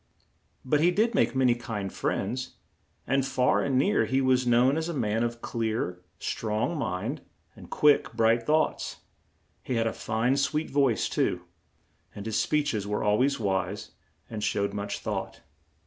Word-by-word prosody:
But 145 +3 +2
he 170 +3 +4
did 220 +6 +2
make 195 - +2
ma 130 - +2
ny 125 - +5
kind 110 -5 -5
friends, 125 +6 -2 0.5
and 135 0 +1
far 130 -1 +2
and 135 -2 +1
near 200 +11 +3
he 130 - +1
was 130 -1 +2
known 120 +3 +4
as 160 +1 -2
a 170 - -3
man 110 -4 0
of 120 0 -3
clear, 110 -6 -2 0.2
strong 110 +8 -2
mind 90 - -3 0.3
and - - -13
quick, 150 -6 +3
bright 115 +1 +3
thoughts; 155 +1 0 0.6
he 125 - -3
had 115 -1 +1
a 115 - 0
fine, 115 +5 0
sweet 150 +3 0
voice, 135 -5 +2
too, 90 - 0 0.7
and 100 - -7
his 110 -1 0
speech 145 +5 +1
es 105 -2 -2
were 105 0 -1
al 105 0 +2
ways 140 +1 +2
wise 95 -1 -2 0.4
and 110 -2 -5
showed 100 -1 0
much 100 0 -3
thought. - - -4
120 Hz, 170 wpm, -27 LUFS, 105-140 Hz, 0.7 s, ny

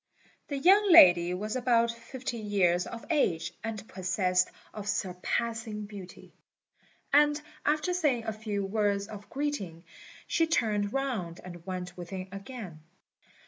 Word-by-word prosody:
The 285 - -3
young 390 +7 +5
lady 175 - +8
was 215 +4 -4
about 235 -2 +3
fifteen 235 -1 -6
years 180 -3 +2
of 230 -1 -8
age, 175 - +1
and 220 -2 -5
possessed 185 0 +1 0.2
of 205 -1 -5
surpassing 210 +3 -2
beauty; 195 -3 -11 0.8
and 295 +1 +5 0.3
after 305 +4 +1
saying 295 -10 +1
a 220 - -2
few 210 -2 -3
words 200 -1 0
of 205 -2 -10
greeting, 210 - -3 0.4
she 330 -1 +1
turned 210 -10 +1
round 230 -11 -2
and 175 -2 -10
went 180 -1 -5
within 185 +1 -7
again. 195 -4 -8
210 Hz, 130 wpm, -29 LUFS, 185-255 Hz, 0.8 s, lady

